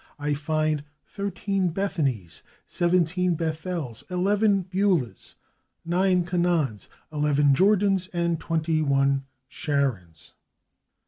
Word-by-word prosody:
I 145 0 -1
find 155 0 -1 0.2
thirteen 195 -2 -2
/Bethanys/, 140 - -2 0.3
seventeen 175 0 +1
/Bethels/, 160 -6 -4
eleven 200 +2 +2
/Beulahs/, 185 - -1 0.5
nine 180 +1 +2
/Canaans/, 170 - 0 0.3
eleven 145 -1 +3
/Jordans/ 195 +2 +3
and 170 -2 0
twenty 160 -1 0
one 140 -1 +2 0.2
/Sharons 115 - -2
165 Hz, 85 wpm, -25 LUFS, 145-185 Hz, 0.5 s, eleven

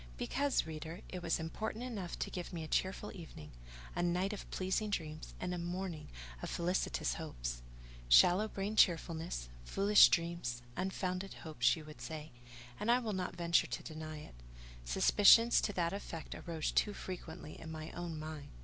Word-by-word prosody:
Because, 280 - +1
reader, 160 +2 -6
it 180 - -5
was 170 -1 0
important 215 +8 -4
enough 210 -8 -4
to - - -3
give 180 -1 -5
me 170 -3 -4
a - - -5
cheerful 190 +5 -1
evening, 160 - -10 0.4
a - - 0
night 180 +3 +1
of 205 - -7
pleasing 190 +3 -1
dreams, 155 -5 -4
and 180 - -2
a 175 - -3
morning 175 -1 -4 0.3
of - - -4
felicitous 170 - 0
hopes. - - -5 0.5
Shallow 180 - +7
brained 210 +1 -2
cheerfulness, 165 - +2 0.2
foolish 200 - +7
dreams, 170 -9 -1
unfounded 185 0 -2
hopes, 125 -7 +3
you 155 - -9
would 150 0 -11
say; 155 -1 -6 0.5
and 210 - -1
I 240 - +7
will 230 -4 -2
not 185 -1 -3
venture 170 0 +3
to - - -4
deny 155 -1 -6
it: 150 - -10 0.5
suspicions 210 - +6
to 205 - -1
that 170 -1 0
effect 165 -5 -6
arose 165 -3 -3
too 210 - +2
frequently 175 -4 -7
in 160 - -7
my 155 0 -6
own 170 -2 -5
mind. 155 -1 -6
170 Hz, 165 wpm, -35 LUFS, 155-190 Hz, 0.5 s, Shallow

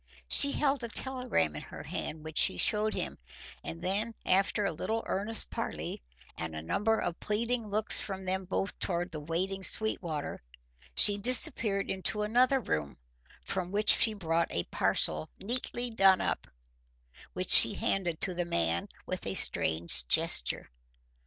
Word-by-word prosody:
She 280 - +4
held 275 -3 0
a 235 - -4
telegram 250 - -1
in - - -6
her - - -10
hand 155 0 -5
which 155 0 -1
she 90 - +5
showed 215 - +2
him, - - -4 0.4
and 80 +1 -8
then 215 +4 -2
after 195 +2 +1
a 195 - 0
little 220 +8 -3
earnest 210 +3 0
parley - - -5 0.3
and 80 -1 -6
a 80 - -5
number 220 - 0
of 175 - -4
pleading 230 +2 -2
looks 215 +1 +3
from 190 -2 -6
them 190 +1 -2
both 195 +2 -3
toward 175 0 -2
the 155 - -6
waiting 180 +6 -3
Sweetwater, 175 -7 -1 0.5
she 205 0 +2
disappeared 230 - +2
into 195 +2 -1
another 250 +5 +2
room, 75 - -3 0.5
from 185 -1 -4
which 210 +1 +4
she 220 -3 +3
brought 165 -3 -1
a 85 - -1
parcel 80 0 -1
neatly 240 +2 +1
done 195 -4 +4
up, - - -2 0.9
which - - -3
she - - +6
handed 175 -4 -1
to 185 - -1
the 175 0 -2
man 85 - 0 0.2
with - - -5
a - - -2
strange 80 -6 +4
gesture. - - -1
195 Hz, 155 wpm, -30 LUFS, 160-220 Hz, 0.9 s, she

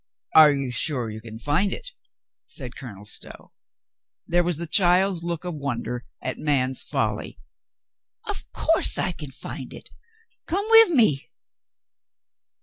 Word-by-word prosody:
"Are 155 -2 +8
you 135 -3 -2
sure 125 -2 0
you 110 +1 -8
can 110 0 -10
find 150 - 0
it?" - - -7 0.6
said 125 -4 -8
Colonel 105 -6 -10
Stow. - - -5 0.7
There 175 +1 +1
was 175 -3 -1
the 170 - -4
child's 180 +1 +3
look 170 -1 -4
of 175 - -4
wonder 125 -4 -4 0.2
at 130 - -4
man's 130 -3 0
folly. - - -2 0.9
"Of - - -5
course - - +4
I - - -1
can 150 -5 -9
find 130 - -7
it. - - -13 0.6
Come 390 +5 -1
wiv 450 -2 +8
me." 220 - +2
150 Hz, 140 wpm, -24 LUFS, 125-175 Hz, 0.9 s, Are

